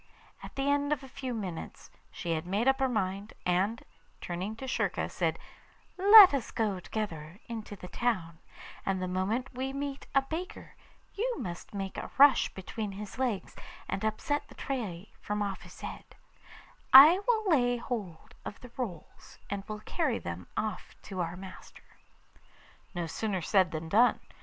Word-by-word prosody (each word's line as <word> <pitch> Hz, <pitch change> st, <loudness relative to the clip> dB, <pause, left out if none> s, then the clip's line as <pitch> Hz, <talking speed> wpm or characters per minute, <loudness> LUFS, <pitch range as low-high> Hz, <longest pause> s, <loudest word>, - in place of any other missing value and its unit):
At -, -, -10 dB
the 275 Hz, 0 st, -1 dB
end 285 Hz, 0 st, +2 dB
of 290 Hz, -2 st, 0 dB
a -, -, -9 dB
few 260 Hz, 0 st, -5 dB
minutes 195 Hz, -8 st, -6 dB, 0.2 s
she 170 Hz, -, -4 dB
had 160 Hz, +1 st, -2 dB
made 205 Hz, +7 st, 0 dB
up 270 Hz, 0 st, +4 dB
her 265 Hz, -1 st, +2 dB
mind, 200 Hz, -2 st, -2 dB
and, 190 Hz, +6 st, +1 dB, 0.4 s
turning 185 Hz, +5 st, -4 dB
to 265 Hz, +4 st, -7 dB
Schurka, 260 Hz, -, 0 dB
said: -, -, -1 dB, 0.6 s
'Let 400 Hz, -1 st, +10 dB
us 265 Hz, -5 st, -1 dB
go 210 Hz, -5 st, -1 dB
together 170 Hz, -5 st, -5 dB
into 220 Hz, -3 st, -6 dB
the 180 Hz, -, -10 dB
town, 180 Hz, -6 st, -2 dB, 0.4 s
and 195 Hz, -1 st, 0 dB
the 185 Hz, -, -2 dB
moment 205 Hz, +9 st, -1 dB
we 265 Hz, +2 st, -3 dB
meet 280 Hz, 0 st, -4 dB
a 275 Hz, -, +5 dB
baker 325 Hz, +6 st, -6 dB, 0.4 s
you 480 Hz, +4 st, -1 dB
must 175 Hz, +3 st, -6 dB
make 195 Hz, -1 st, -4 dB
a -, -, -6 dB
rush 280 Hz, -1 st, +7 dB
between 200 Hz, +2 st, -5 dB
his 205 Hz, +4 st, -8 dB
legs 240 Hz, -7 st, -1 dB, 0.3 s
and 195 Hz, -, -3 dB
upset 220 Hz, +7 st, -1 dB
the -, -, -15 dB
tray 215 Hz, -8 st, -4 dB
from 210 Hz, 0 st, -2 dB
off 195 Hz, -2 st, -4 dB
his -, -, -13 dB
head; -, -, -8 dB, 0.8 s
I 300 Hz, +8 st, +11 dB
will 440 Hz, -3 st, +2 dB
lay 245 Hz, -5 st, +3 dB
hold 210 Hz, -9 st, -6 dB
of 205 Hz, -, -7 dB
the 250 Hz, -, -12 dB
rolls, 200 Hz, -11 st, -7 dB
and 200 Hz, -1 st, -2 dB
will 215 Hz, -1 st, -6 dB
carry 290 Hz, -1 st, 0 dB
them 85 Hz, +1 st, -6 dB
off 215 Hz, 0 st, -3 dB
to 190 Hz, -3 st, -4 dB
our 170 Hz, +1 st, -3 dB
master.' 190 Hz, 0 st, -13 dB, 1.0 s
No 175 Hz, -1 st, -1 dB
sooner 190 Hz, +2 st, -2 dB
said 190 Hz, -1 st, +3 dB
than 160 Hz, 0 st, -5 dB
done. 225 Hz, +9 st, +4 dB
215 Hz, 165 wpm, -30 LUFS, 185-265 Hz, 1.0 s, I